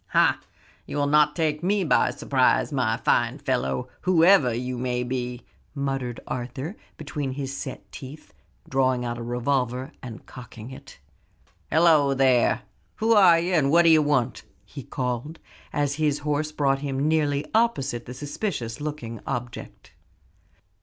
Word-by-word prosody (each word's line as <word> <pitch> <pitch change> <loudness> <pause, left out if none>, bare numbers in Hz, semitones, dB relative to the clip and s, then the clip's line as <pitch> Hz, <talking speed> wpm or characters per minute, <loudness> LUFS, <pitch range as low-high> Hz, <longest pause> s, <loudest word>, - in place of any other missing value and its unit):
"Ha! - - +3 0.5
you'll 145 -1 -1
not 150 0 +3
take 155 -2 0
me 200 +2 +1
by 160 - +3
surprise, 130 +2 +1
my 120 -5 0
fine 120 +2 +1
fellow, 125 - -1
whoever 175 -6 +5
you 125 +2 -3
may 125 0 -1
be," 125 -1 -4 0.3
muttered 135 -4 -3
Arthur 130 - -5 0.2
between 145 -3 -4
his 135 0 -4
set 135 -2 -7
teeth, 145 +3 -11 0.3
drawing 130 -2 +1
out 120 0 -4
a - - -6
revolver 125 +2 -1
and 115 -3 -9
cocking 125 -2 -11
it, 130 - -12 0.7
"Halloo 155 -4 +4
there! 130 -3 +3 0.3
Who 225 +1 +2
are 190 -6 +7
you; 175 +2 -1
and 150 -5 +3
what 170 +4 +5
d'ye 160 -2 +6
want?" 140 -5 0 0.2
he 140 - -9
called, 125 +4 -4 0.3
as 145 -1 0
his 150 -2 +2
horse 150 +1 -1
brought 140 -3 +1
him 140 0 -2
nearly 150 -2 +1
opposite 140 - 0
the 125 - -7
suspicious 145 - -4
looking 145 -7 -5
object. 125 -3 -6
135 Hz, 140 wpm, -25 LUFS, 125-150 Hz, 0.7 s, are